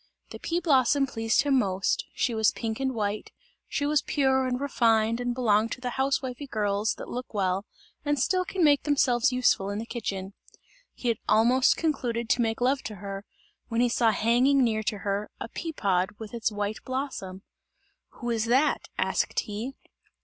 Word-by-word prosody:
The -, -, -8 dB
pea 335 Hz, +1 st, -1 dB
blossom 280 Hz, -4 st, +3 dB
pleased 225 Hz, -3 st, +1 dB
him 275 Hz, -2 st, +3 dB
most, 195 Hz, -4 st, 0 dB
she 240 Hz, -, 0 dB
was 220 Hz, -1 st, +3 dB
pink 225 Hz, -1 st, -4 dB
and 265 Hz, -1 st, -1 dB
white, 210 Hz, -1 st, -2 dB, 0.4 s
she 285 Hz, -, -1 dB
was 295 Hz, 0 st, +2 dB
pure 265 Hz, -2 st, +1 dB
and 250 Hz, 0 st, -1 dB
refined 230 Hz, -4 st, +2 dB
and 245 Hz, 0 st, -1 dB
belonged 225 Hz, -2 st, +2 dB
to -, -, -8 dB
the 250 Hz, -1 st, -3 dB
housewifely 265 Hz, 0 st, -1 dB
girls 210 Hz, -2 st, 0 dB
that -, -, -8 dB
look 250 Hz, -2 st, -6 dB
well, 190 Hz, 0 st, 0 dB, 0.4 s
and 290 Hz, 0 st, 0 dB
still 365 Hz, +8 st, +1 dB
can 365 Hz, 0 st, -2 dB
make 290 Hz, -2 st, +5 dB
themselves 260 Hz, -5 st, +2 dB
useful 245 Hz, -6 st, +2 dB
in 205 Hz, -, -3 dB
the 225 Hz, -, -4 dB
kitchen. 200 Hz, -5 st, -4 dB, 0.6 s
He 245 Hz, -, -2 dB
had 230 Hz, -, 0 dB
almost 245 Hz, +4 st, +4 dB
concluded 240 Hz, -7 st, -1 dB
to 245 Hz, -, +3 dB
make 225 Hz, 0 st, -1 dB
love 265 Hz, +2 st, +2 dB
to 215 Hz, -, -5 dB
her, 195 Hz, +1 st, -7 dB, 0.4 s
when 230 Hz, -, -1 dB
he 245 Hz, 0 st, +3 dB
saw 230 Hz, -1 st, +3 dB
hanging 245 Hz, +6 st, +3 dB
near 220 Hz, -2 st, +1 dB
to 210 Hz, 0 st, -2 dB
her, 200 Hz, +1 st, -1 dB
a -, -, -5 dB
pea 330 Hz, +6 st, -5 dB
pod 190 Hz, -, 0 dB
with 220 Hz, 0 st, -9 dB
its 230 Hz, -1 st, -1 dB
white 205 Hz, +1 st, -3 dB
blossom. 255 Hz, -8 st, -4 dB, 0.7 s
"Who 240 Hz, -1 st, -4 dB
is 225 Hz, -1 st, 0 dB
that?" 260 Hz, +6 st, +2 dB
asked -, -, 0 dB
he. 220 Hz, +6 st, -6 dB
235 Hz, 185 wpm, -27 LUFS, 215-265 Hz, 0.7 s, make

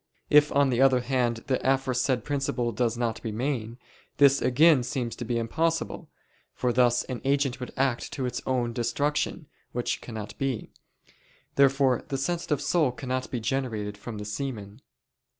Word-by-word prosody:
If 150 Hz, 0 st, +6 dB
on 140 Hz, -1 st, +3 dB
the 125 Hz, +1 st, +1 dB
other 130 Hz, -2 st, +5 dB
hand 120 Hz, -2 st, 0 dB
the 135 Hz, -3 st, 0 dB
aforesaid 130 Hz, -1 st, +1 dB
principle 135 Hz, -4 st, -1 dB
does 115 Hz, +1 st, 0 dB
not 115 Hz, -2 st, -2 dB
remain, 115 Hz, 0 st, -3 dB, 0.4 s
this 140 Hz, -1 st, +5 dB
again 145 Hz, +2 st, +5 dB
seems 125 Hz, -1 st, -3 dB
to -, -, -4 dB
be 120 Hz, +1 st, -1 dB
impossible: 165 Hz, +8 st, -1 dB, 0.5 s
for 125 Hz, -1 st, 0 dB
thus 120 Hz, -1 st, +3 dB
an 125 Hz, -2 st, -6 dB
agent 135 Hz, -1 st, +1 dB
would 125 Hz, -, -6 dB
act 130 Hz, -3 st, 0 dB
to 135 Hz, -, -2 dB
its 125 Hz, -1 st, -3 dB
own 125 Hz, -2 st, 0 dB
destruction, 145 Hz, +7 st, -1 dB, 0.3 s
which 120 Hz, 0 st, -2 dB
cannot 110 Hz, -3 st, -7 dB
be. 135 Hz, -5 st, -2 dB, 0.8 s
Therefore 135 Hz, -2 st, +3 dB
the 135 Hz, -, -2 dB
sensitive 155 Hz, 0 st, -1 dB
soul 155 Hz, -7 st, +2 dB
cannot 130 Hz, 0 st, -4 dB
be 125 Hz, -, -2 dB
generated 110 Hz, -4 st, -2 dB
from 110 Hz, +2 st, -8 dB
the 105 Hz, -, -6 dB
semen. 105 Hz, -1 st, -5 dB
125 Hz, 155 wpm, -27 LUFS, 120-135 Hz, 0.8 s, If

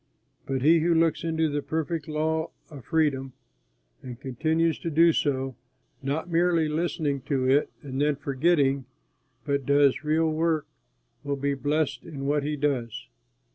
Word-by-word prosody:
But 135 Hz, -1 st, -1 dB
he 165 Hz, +3 st, +6 dB
who 170 Hz, +1 st, +2 dB
looks 165 Hz, 0 st, +2 dB
into 160 Hz, -1 st, +1 dB
the 145 Hz, -1 st, -2 dB
perfect 160 Hz, +1 st, -3 dB
law 160 Hz, +1 st, -1 dB, 0.2 s
of 140 Hz, -5 st, -10 dB
freedom 140 Hz, -5 st, 0 dB, 0.7 s
and 125 Hz, -2 st, -8 dB
continues 160 Hz, +5 st, 0 dB
to 165 Hz, -, -3 dB
do 165 Hz, +2 st, +5 dB
so, 135 Hz, -3 st, -1 dB, 0.5 s
not 140 Hz, +5 st, -2 dB
merely 170 Hz, -1 st, +2 dB
listening 150 Hz, -3 st, -1 dB
to 130 Hz, -3 st, 0 dB
it 140 Hz, +3 st, +3 dB
and 135 Hz, -1 st, -4 dB
then 150 Hz, 0 st, +2 dB
forgetting, 140 Hz, -1 st, +1 dB, 0.6 s
but 140 Hz, -1 st, 0 dB
does 140 Hz, 0 st, +3 dB
real 160 Hz, +1 st, +2 dB
work, 160 Hz, -1 st, 0 dB, 0.6 s
will 145 Hz, 0 st, -1 dB
be 140 Hz, +1 st, -1 dB
blessed 145 Hz, 0 st, -1 dB
in 140 Hz, -5 st, -7 dB
what 145 Hz, +1 st, +1 dB
he 150 Hz, +1 st, -2 dB
does. 135 Hz, -, -2 dB
150 Hz, 150 wpm, -26 LUFS, 140-160 Hz, 0.7 s, he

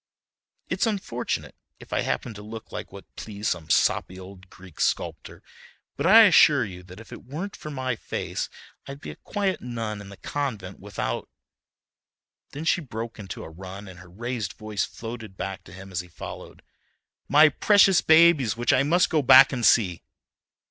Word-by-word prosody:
It's -, -, 0 dB
unfortunate, 190 Hz, -, -3 dB, 0.3 s
if -, -, -11 dB
I -, -, +1 dB
happen 120 Hz, -, -2 dB
to 105 Hz, -, -10 dB
look 110 Hz, +1 st, -9 dB
like -, -, -7 dB
what 100 Hz, 0 st, -14 dB
pleased 105 Hz, 0 st, -4 dB
some 80 Hz, -3 st, -4 dB
soppy 95 Hz, +4 st, +1 dB
old 95 Hz, 0 st, -13 dB
Greek 90 Hz, -3 st, -15 dB
sculptor, -, -, -2 dB, 0.5 s
but -, -, -1 dB
I 225 Hz, +4 st, +9 dB
assure 150 Hz, -, +6 dB
you 90 Hz, -3 st, -9 dB
that 90 Hz, +2 st, -13 dB
if 115 Hz, -, -14 dB
it -, -, -10 dB
weren't 160 Hz, +10 st, -6 dB
for 155 Hz, -, -9 dB
my 130 Hz, -3 st, -2 dB
face -, -, -4 dB, 0.4 s
I'd 140 Hz, 0 st, -8 dB
be -, -, -8 dB
a -, -, -11 dB
quiet 200 Hz, -2 st, -2 dB
nun 115 Hz, -4 st, -5 dB
in 100 Hz, -, -11 dB
the 100 Hz, -, -12 dB
convent 110 Hz, -10 st, -4 dB
without"—then -, -, -9 dB
she 170 Hz, -, +2 dB
broke 115 Hz, -4 st, -7 dB
into 100 Hz, -2 st, -7 dB
a -, -, -9 dB
run 95 Hz, +4 st, -9 dB
and 90 Hz, -1 st, -12 dB
her 90 Hz, -1 st, -14 dB
raised 115 Hz, +1 st, -4 dB
voice 110 Hz, -1 st, -3 dB
floated 115 Hz, -4 st, -9 dB
back 95 Hz, -1 st, -5 dB
to -, -, -14 dB
him 95 Hz, +2 st, -11 dB
as 90 Hz, -, -2 dB
he 90 Hz, -, -6 dB
followed—"my 145 Hz, -, -1 dB
precious 195 Hz, +3 st, +4 dB
babies, 160 Hz, -8 st, +5 dB
which 120 Hz, 0 st, +2 dB
I -, -, +4 dB
must 170 Hz, +6 st, +3 dB
go 155 Hz, -3 st, +3 dB
back 135 Hz, +1 st, +8 dB
and 125 Hz, -2 st, -3 dB
see." 95 Hz, -8 st, +3 dB
115 Hz, 175 wpm, -25 LUFS, 95-140 Hz, 0.5 s, I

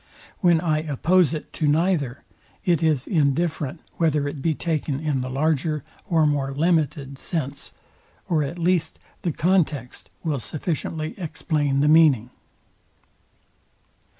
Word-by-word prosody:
When 175 Hz, -4 st, +4 dB
I 155 Hz, -2 st, +1 dB
oppose 160 Hz, +3 st, +2 dB
it 155 Hz, -, -8 dB
to 155 Hz, -, 0 dB
neither, 150 Hz, -4 st, +1 dB, 0.4 s
it 175 Hz, -5 st, +2 dB
is 155 Hz, -5 st, +2 dB
indifferent 155 Hz, -1 st, 0 dB, 0.2 s
whether 150 Hz, -3 st, +1 dB
it 145 Hz, -1 st, -5 dB
be 160 Hz, +1 st, +1 dB
taken 155 Hz, -4 st, -2 dB
in 150 Hz, -4 st, -1 dB
the 130 Hz, -, -4 dB
larger 150 Hz, +1 st, 0 dB, 0.3 s
or 165 Hz, -3 st, +4 dB
more 140 Hz, -2 st, 0 dB
limited 150 Hz, -4 st, 0 dB
sense, 145 Hz, -5 st, -4 dB, 0.6 s
or 160 Hz, -3 st, +2 dB
at 150 Hz, +4 st, -3 dB
least 170 Hz, -1 st, +1 dB, 0.2 s
the 175 Hz, -, 0 dB
context 155 Hz, -7 st, 0 dB
will 150 Hz, -4 st, -1 dB
sufficiently 155 Hz, +3 st, -3 dB
explain 150 Hz, -4 st, -1 dB
the 150 Hz, -, +3 dB
meaning. 150 Hz, -7 st, +5 dB
155 Hz, 125 wpm, -24 LUFS, 140-165 Hz, 0.6 s, meaning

